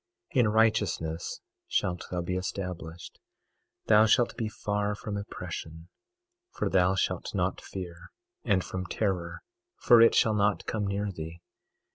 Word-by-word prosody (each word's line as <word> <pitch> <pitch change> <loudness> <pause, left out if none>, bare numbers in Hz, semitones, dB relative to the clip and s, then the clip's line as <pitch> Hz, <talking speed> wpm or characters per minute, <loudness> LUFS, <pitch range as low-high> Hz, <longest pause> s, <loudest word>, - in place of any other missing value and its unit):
22:14 135 - +3
In 120 - +5
righteousness 105 -7 +1 0.3
shalt 90 -1 -1
thou 90 -1 -2
be 90 +2 -2
established; 90 -3 -5 0.7
thou 110 0 +6
shalt 120 +2 +3
be 110 -2 -2
far 105 0 -1
from 105 0 -5
oppression 85 -4 -7 0.6
for - - -2
thou 95 0 +3
shalt - - -1
not - - 0
fear, 90 -2 -8 0.3
and 100 -5 +2
from 90 -1 -5
terror 90 -6 -2 0.3
for 120 -1 +6
it 115 - +6
shall 110 - +4
not 105 -1 +1
come 105 -2 -2
near 100 +1 -1
thee. 80 -1 -7
95 Hz, 140 wpm, -29 LUFS, 90-105 Hz, 0.7 s, thou